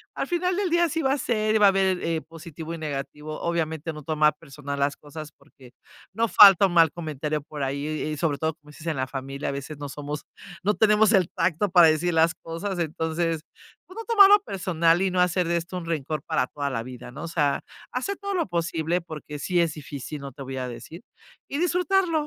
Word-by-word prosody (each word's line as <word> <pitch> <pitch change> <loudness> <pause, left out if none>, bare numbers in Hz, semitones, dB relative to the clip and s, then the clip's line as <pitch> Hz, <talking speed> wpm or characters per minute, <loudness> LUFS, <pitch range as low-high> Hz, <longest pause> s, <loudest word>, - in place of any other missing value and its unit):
al - - -2
final 360 +1 0
del 390 -1 0
día 345 +1 +3
así 325 0 -1
va 270 -3 +2
a - - 0
ser 215 -4 0
y - - +6
va 210 - +5
a - - +8
haber 195 0 +2
el, - - -9
eh, 165 -1 -1
positivo 165 0 -9
y - - -5
negativo. 150 0 -5
Obviamente, 165 -1 -2
no 150 -1 -9
tomar 150 0 +2
personal 140 -2 -7
las 140 +1 +1
cosas 150 +1 -10
porque 135 -3 -19 0.4
no 230 +3 +1
falta 195 +1 +9
un 175 - -5
mal 165 -3 +5
comentario 155 -2 -3
por 145 0 -8
ahí 140 +2 -2
y 155 -1 -3
y - - -5
sobre 145 -2 0
todo, 160 0 -1
como 150 -1 -21
dices, 155 +2 -11
en 160 - 0
la 130 - -1
familia, 135 +1 -5
a - - -1
veces, 140 +2 -6
no 145 -1 -5
somos 145 +2 -6 0.4
no 205 +2 +2
tenemos 215 0 +4
el 185 -4 +3
tacto 175 +4 0
para 175 -3 +8
decir 160 +3 +1
las 165 +1 +4
cosas. 175 +3 -5
Entonces, 160 0 -1 0.4
pues, 370 - -14
no 455 - -5
tomarlo 410 -2 +7
personal 170 -2 +1
y 190 -1 +1
no 180 - 0
hacer 180 -1 +2
de 170 - +1
esto 170 +2 -5
un 175 - -6
rencor 155 -2 -3
para 125 - 0
toda 145 -1 -3
la 115 -4 -3
vida, 125 0 -9
¿no? 145 +5 -8
O - - -4
sea, 150 -4 0 0.3
hacer 260 +11 -2
todo 400 -1 -4
lo 345 - +1
posible, 170 0 -1
porque 155 -2 -8
sí 175 +4 0
es 165 -2 +2
difícil, 145 -1 -7
no 140 - -7
te 135 - -12
voy 135 0 -6
a 130 -1 -3
decir, 155 +7 -9 0.5
y 280 - -3
disfrutarlo. 360 +1 +1
165 Hz, 230 wpm, -25 LUFS, 150-190 Hz, 0.5 s, falta